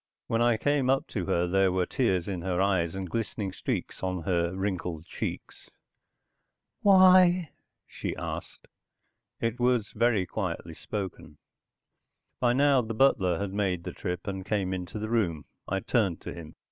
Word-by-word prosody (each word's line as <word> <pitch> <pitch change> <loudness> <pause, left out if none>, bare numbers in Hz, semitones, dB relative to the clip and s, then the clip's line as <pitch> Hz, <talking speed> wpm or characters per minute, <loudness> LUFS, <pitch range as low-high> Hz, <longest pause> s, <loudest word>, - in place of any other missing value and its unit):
When 115 0 0
I 120 -1 +4
came 145 +1 +1
up 135 0 +2
to 95 -6 -3
her 85 +1 +2
there 95 +1 +3
were 90 0 +1
tears 95 -10 0
in 95 -3 -3
her 90 0 -1
eyes 95 -3 +1
and 95 -1 -4
glistening 105 0 -3
streaks - - -4
on 90 -2 -2
her 85 -1 +1
wrinkled 90 -4 -3
cheeks. - - -6 1.1
"Why?" 185 -3 +6 0.3
she - - -5
asked. - - -6 0.7
It 115 +1 -1
was 120 -3 +2
very 110 -4 +2
quietly 85 -4 -4
spoken. 95 +2 -6 1.0
By 120 -1 +3
now 140 0 +4
the 115 -1 -5
butler 95 -9 +3
had 100 0 -3
made 95 -4 0
the - - -6
trip, 90 -3 -4
and 95 -1 -4
came 95 -2 -1
into 90 +2 -5
the 110 +1 -3
room. 90 - 0 0.2
I 95 0 -1
turned 105 -8 +1
to - - -6
him. 80 -2 -10
100 Hz, 160 wpm, -28 LUFS, 90-120 Hz, 1.1 s, Why